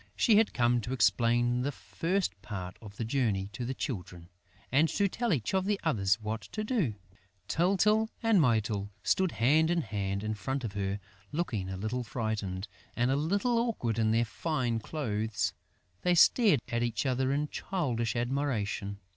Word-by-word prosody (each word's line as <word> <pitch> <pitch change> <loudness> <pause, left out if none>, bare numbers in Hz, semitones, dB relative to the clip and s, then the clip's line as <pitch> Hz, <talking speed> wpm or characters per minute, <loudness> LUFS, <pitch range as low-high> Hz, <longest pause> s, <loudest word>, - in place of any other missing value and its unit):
She 220 -4 +4
had 220 0 +4
come 120 -1 +2
to 120 +4 -4
explain 120 -1 +3
the 140 +3 -1
first 170 - -2
part 95 -4 -6
of 105 -2 -11
the 115 - -2
journey 110 -6 0
to 125 - -4
the 130 +2 -3
Children 90 - -5 0.4
and 150 +5 +4
to 200 - +2
tell 235 +4 -1
each 135 - 0
of 190 -1 +2
the 205 0 0
others 105 -9 +2
what 110 +1 -3
to 215 - -2
do. 210 - 0 0.5
Tyltyl 205 +5 +3
and 225 -5 +5
Mytyl 110 -5 +1
stood 190 -2 +2
hand 155 +7 +3
in 175 -1 +2
hand 100 -3 -3
in 110 0 -1
front 130 +6 -3
of 110 -4 -4
her, 100 0 -2 0.3
looking 115 - -2
a 95 - -4
little 110 +6 -2
frightened 110 -4 -3 0.3
and 120 +2 +2
a - - +3
little 200 - +1
awkward 125 - -1
in 110 -1 +3
their 115 +2 +3
fine 125 -3 -1
clothes. 110 -5 -2 0.5
They 180 0 +3
stared 185 - +5
at 120 0 -1
each 120 +1 -1
other 130 0 +1
in 145 +1 0
childish 120 - -2
admiration. 120 -6 -1
120 Hz, 170 wpm, -30 LUFS, 110-160 Hz, 0.5 s, and